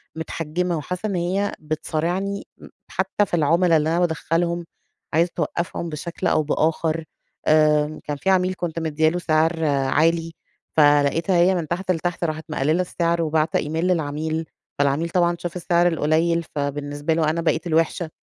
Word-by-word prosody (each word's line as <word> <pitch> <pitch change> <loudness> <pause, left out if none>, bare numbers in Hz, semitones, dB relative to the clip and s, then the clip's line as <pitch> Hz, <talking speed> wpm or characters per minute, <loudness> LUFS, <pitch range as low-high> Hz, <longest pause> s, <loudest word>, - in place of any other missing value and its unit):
مِتحَجِّمة، 165 +2 -2
وحاسّة 180 +7 -4
إن 200 - -2
هي 185 +4 0
بتصارعني 170 +6 -2
م - - -13 0.2
حتّى 190 +2 0
في - - -20
العملا 165 +1 +4
اللي 155 +1 0
أنا 170 +2 +1
بادخّلهم 170 0 0 0.5
عايزة 170 +3 +3
توقّفهم 170 +1 -3
بشكل 165 +3 -4
أو 155 - +2
بآخر. 160 +1 0 0.4
آآ 155 0 +3
كان 145 -1 -4
في 190 - -1
عميل 185 -1 +3
كنت 170 -2 -3
مدّية 155 -1 +1
له 175 - -2
سعر 160 0 +1
عالي، 155 +4 +1 0.4
فلقيتها 150 +4 +4
هي 180 +2 +4
من 170 -3 -2
تحت 185 +3 -1
لتحت 175 0 -2
راحت 155 -1 -2
مقلّلة 155 +4 +1
السعر، 170 -1 0
وباعتة 155 0 +1
إيميل 160 +4 -2
للعميل. 160 -1 -1 0.3
فالعميل 145 +4 +1
طبعًا 175 -1 +2
شاف 175 0 -5
السعر 175 0 +2
القليل 165 +1 +1
فبالنسبة 145 +1 -2
له 160 -1 +2
أنا 165 +2 -1
بقيت 165 +1 0
الوحشة. 165 0 +1
165 Hz, 155 wpm, -22 LUFS, 155-175 Hz, 0.5 s, العملا